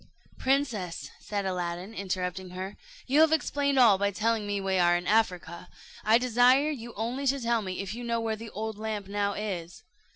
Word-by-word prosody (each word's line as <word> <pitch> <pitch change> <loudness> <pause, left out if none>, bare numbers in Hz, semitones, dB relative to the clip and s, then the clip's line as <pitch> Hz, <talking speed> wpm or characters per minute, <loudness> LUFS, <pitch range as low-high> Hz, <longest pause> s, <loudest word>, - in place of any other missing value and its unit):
"Princess," 215 - -1
said 205 -2 -3
Aladdin, 180 +2 -3
interrupting 185 -2 -3
her, 185 +2 -6 0.3
"you 280 +4 +4
have 320 0 +6
explained 285 -3 +1
all 225 -7 +6
by 200 0 +2
telling 215 +2 0
me 205 0 -1
we 190 -1 0
are 175 0 +4
in 175 - -6
Africa 180 -5 0 0.3
I 220 +2 +5
desire 250 +4 +4
you 235 -5 -7
only 245 +6 -2
to 275 +1 +2
tell 235 -2 +1
me 185 -2 -4
if 195 +1 -5
you 240 +2 -6
know 235 -1 0
where 225 -1 -1
the 225 +1 -9
old 215 0 -5
lamp 215 -2 -4
now 200 0 -1
is." 190 -4 -5
210 Hz, 190 wpm, -28 LUFS, 190-235 Hz, 0.3 s, have